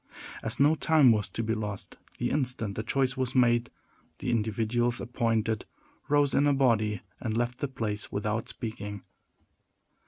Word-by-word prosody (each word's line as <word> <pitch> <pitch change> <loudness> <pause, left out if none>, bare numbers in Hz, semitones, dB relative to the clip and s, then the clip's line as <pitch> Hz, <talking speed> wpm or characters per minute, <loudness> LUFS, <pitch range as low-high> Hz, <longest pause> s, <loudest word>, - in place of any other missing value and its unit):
As 110 +3 -2
no 145 +3 +6
time 155 -5 +5
was 105 -2 +1
to 115 - -3
be 110 0 0
lost, 105 -2 -5 0.2
the 120 - -1
instant 125 -7 0
the 110 - -3
choice 130 +4 0
was 130 -1 -2
made 120 -1 +3 0.5
the 125 - -2
individuals 115 +2 0
appointed 115 -2 -1 0.4
rose 145 -1 +3
in 145 - +4
a 145 - +4
body 110 -6 +2 0.2
and 110 -1 -2
left 120 +1 -1
the 145 - -1
place 110 -5 -4
without 105 +2 -2
speaking. 105 -3 -6
120 Hz, 155 wpm, -28 LUFS, 110-130 Hz, 0.5 s, no